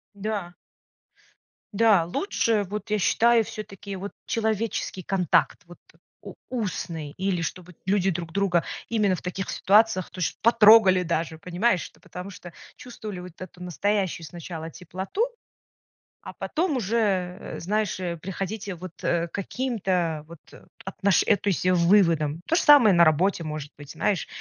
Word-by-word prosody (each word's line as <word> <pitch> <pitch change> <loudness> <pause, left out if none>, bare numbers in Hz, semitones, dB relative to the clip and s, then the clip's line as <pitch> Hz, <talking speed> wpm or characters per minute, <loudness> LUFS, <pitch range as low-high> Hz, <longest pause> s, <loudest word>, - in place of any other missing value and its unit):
Да. 200 -4 -4 1.2
Да. 205 -5 +4
Лучше, 220 - 0
вот, 210 +1 -5
я 215 -1 +1
считаю, 230 +4 +4
всё-таки 200 -2 -8
вот 200 +2 -6
человеческий 220 -4 -2
контакт, 185 -1 +1
вот 175 0 -14 0.4
у - - -9 0.2
устный, 170 - -4
или 190 -2 -1
чтобы 180 +2 -6
люди 195 -1 +2
друг 170 -2 -4
друга 180 -3 +1 0.3
именно 210 -5 +2
в - - -9
таких 185 +1 -4
ситуациях 205 -1 +3
то - - -11
есть 175 - -2
потрогали 215 -5 +6
даже, 165 -1 -2
понимаешь. 180 +3 0
Ну, - - -25
потому 180 +2 -8
что 175 -2 -11 0.3
чувствовали 215 -6 -8
вот 180 -1 -9
эту 185 -1 -10
настоящую 185 0 -1
сначала 165 -1 -7
теплоту, 190 - -4 1.0
а - - -9
потом 320 -4 -1
уже, 230 +1 -1 0.4
э, - - -7
знаешь 210 +2 -1 0.2
приходите 195 +1 -5
вот, 180 +1 -8
э, 170 0 +1
каким-то 190 - -2
вот 170 -1 -12 0.5
отношен 190 0 +1
э, 205 - +5
то - - -7
есть 180 - -1
выводам. 170 -4 +3
То 330 - +2
же 335 - +3
самое 275 -10 +7
на 170 - +6
работе 170 +3 +2
может 150 -2 -6
быть, 145 -1 -11
знаешь, 200 -4 -1
190 Hz, 145 wpm, -25 LUFS, 175-215 Hz, 1.2 s, самое